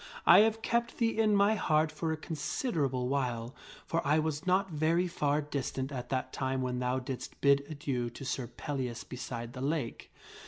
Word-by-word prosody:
I -, -, +9 dB
have 220 Hz, +1 st, +3 dB
kept 235 Hz, 0 st, 0 dB
thee 230 Hz, -1 st, +1 dB
in 215 Hz, -2 st, +4 dB
my 200 Hz, +2 st, +5 dB
heart 155 Hz, -6 st, +2 dB
for 160 Hz, +1 st, -2 dB
a 160 Hz, -, -1 dB
considerable 150 Hz, -, -1 dB
while, 125 Hz, -3 st, -1 dB, 0.3 s
for 165 Hz, -, 0 dB
1 150 Hz, +2 st, +2 dB
was 160 Hz, +2 st, -3 dB
not 190 Hz, +1 st, +2 dB
very 165 Hz, +4 st, +2 dB
far 150 Hz, -4 st, +1 dB
distant 135 Hz, -1 st, -3 dB
at 125 Hz, -2 st, -5 dB
that 130 Hz, -1 st, -2 dB
time 130 Hz, -1 st, -1 dB
when 125 Hz, -1 st, -1 dB
thou 125 Hz, +1 st, 0 dB
didst 130 Hz, 0 st, -6 dB
bid 140 Hz, 0 st, +4 dB
adieu 135 Hz, -5 st, -2 dB
to 125 Hz, +4 st, -9 dB
Sir 130 Hz, -1 st, -2 dB
Pellias 125 Hz, -3 st, -4 dB
beside 120 Hz, -2 st, -6 dB
the 130 Hz, -, -7 dB
lake. 140 Hz, -4 st, -2 dB
145 Hz, 185 wpm, -31 LUFS, 130-165 Hz, 0.3 s, I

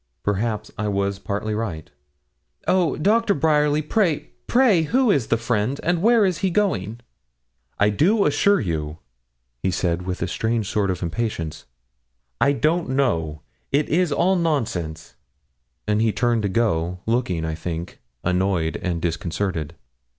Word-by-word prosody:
Perhaps 105 Hz, +1 st, -1 dB
I 105 Hz, -, -1 dB
was 100 Hz, -1 st, -1 dB
partly 105 Hz, +2 st, -3 dB
right. 105 Hz, -8 st, -4 dB, 0.8 s
'Oh! 180 Hz, -6 st, +2 dB
Doctor 210 Hz, +6 st, +2 dB
Bryerly, 150 Hz, 0 st, +2 dB
pray, 170 Hz, -2 st, 0 dB, 0.2 s
pray 235 Hz, -9 st, +4 dB
who 245 Hz, -, +2 dB
is 135 Hz, -, +1 dB
the 115 Hz, -, +2 dB
friend, 115 Hz, +3 st, -1 dB
and 175 Hz, 0 st, +1 dB
where 230 Hz, 0 st, +5 dB
is 185 Hz, -4 st, 0 dB
he 190 Hz, -, +1 dB
going?' 120 Hz, -, -1 dB, 0.8 s
'I 105 Hz, -, +4 dB
do 200 Hz, -, +3 dB
assure 175 Hz, +8 st, +3 dB
you,' 80 Hz, -4 st, -3 dB, 0.6 s
he -, -, +1 dB
said, 90 Hz, -1 st, 0 dB
with 90 Hz, -2 st, -2 dB
a -, -, -1 dB
strange 110 Hz, +3 st, -1 dB
sort 100 Hz, -1 st, 0 dB
of 90 Hz, -1 st, -2 dB
impatience, 85 Hz, -4 st, -3 dB, 0.8 s
'I 140 Hz, -, +5 dB
don't 160 Hz, +3 st, +1 dB
know; 80 Hz, -, 0 dB, 0.3 s
it 145 Hz, +2 st, +1 dB
is 175 Hz, 0 st, +2 dB
all 180 Hz, +6 st, +2 dB
nonsense.' 90 Hz, -, -2 dB, 0.7 s
And 105 Hz, +1 st, +2 dB
he 110 Hz, -1 st, +3 dB
turned 120 Hz, 0 st, +1 dB
to 100 Hz, -, -1 dB
go, 90 Hz, -5 st, 0 dB
looking, 110 Hz, -8 st, 0 dB
I 80 Hz, -, -2 dB
think, 85 Hz, +1 st, -5 dB, 0.2 s
annoyed 90 Hz, -3 st, 0 dB
and 85 Hz, -3 st, -3 dB
disconcerted. 85 Hz, -2 st, -2 dB
110 Hz, 145 wpm, -23 LUFS, -, 0.8 s, where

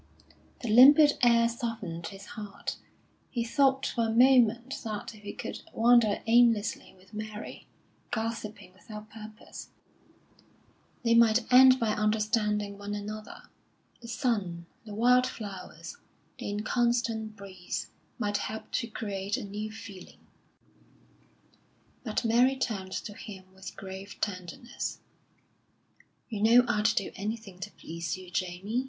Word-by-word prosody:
The 240 Hz, -, -4 dB
limpid 285 Hz, +7 st, +7 dB
air 235 Hz, -1 st, +5 dB
softened 225 Hz, -8 st, -4 dB
his 195 Hz, 0 st, -10 dB
heart; 210 Hz, -2 st, -6 dB, 0.5 s
he 235 Hz, -2 st, -1 dB
thought 265 Hz, +3 st, +2 dB
for 230 Hz, -2 st, 0 dB
a -, -, -2 dB
moment 245 Hz, +1 st, +4 dB
that 215 Hz, -1 st, -5 dB
if 215 Hz, -, -15 dB
he 205 Hz, 0 st, -6 dB
could -, -, -6 dB
wander 230 Hz, -2 st, +4 dB
aimlessly 225 Hz, -4 st, +3 dB
with 185 Hz, +3 st, -22 dB
Mary, 215 Hz, 0 st, -7 dB, 0.4 s
gossiping 220 Hz, -4 st, -4 dB
without 210 Hz, +2 st, -11 dB
purpose, 215 Hz, -1 st, -10 dB, 1.3 s
they 230 Hz, -1 st, +3 dB
might 230 Hz, 0 st, +5 dB
end 260 Hz, 0 st, +8 dB
by 230 Hz, -, +1 dB
understanding 210 Hz, -1 st, 0 dB
one 205 Hz, 0 st, -4 dB
another. 215 Hz, +1 st, -7 dB, 0.6 s
The 235 Hz, -, -10 dB
sun, 205 Hz, -9 st, -1 dB, 0.2 s
the 210 Hz, -2 st, -8 dB
wild 250 Hz, +3 st, +4 dB
flowers, 200 Hz, -7 st, -8 dB, 0.4 s
the -, -, -4 dB
inconstant 225 Hz, +1 st, 0 dB
breeze, 190 Hz, -3 st, -6 dB, 0.3 s
might 205 Hz, 0 st, 0 dB
help 220 Hz, 0 st, -6 dB
to 235 Hz, -, -1 dB
create 205 Hz, -1 st, -3 dB
a -, -, -5 dB
new 210 Hz, +2 st, -5 dB
feeling. 200 Hz, -4 st, -11 dB, 1.8 s
But 225 Hz, +1 st, -2 dB
Mary 245 Hz, +4 st, +4 dB
turned 195 Hz, -7 st, -3 dB
to 205 Hz, -, -5 dB
him 190 Hz, -3 st, -11 dB
with 190 Hz, 0 st, -10 dB
grave 195 Hz, +1 st, -8 dB
tenderness. 185 Hz, +4 st, -4 dB, 1.3 s
"You 215 Hz, -4 st, -5 dB
know 235 Hz, +3 st, +6 dB
I'd 210 Hz, -3 st, 0 dB
do 210 Hz, -2 st, +1 dB
anything 210 Hz, -2 st, -5 dB
to 185 Hz, -, -5 dB
please 170 Hz, +2 st, -5 dB
you, 185 Hz, -1 st, -12 dB
Jamie. 185 Hz, +6 st, -2 dB
215 Hz, 125 wpm, -29 LUFS, 200-235 Hz, 1.8 s, end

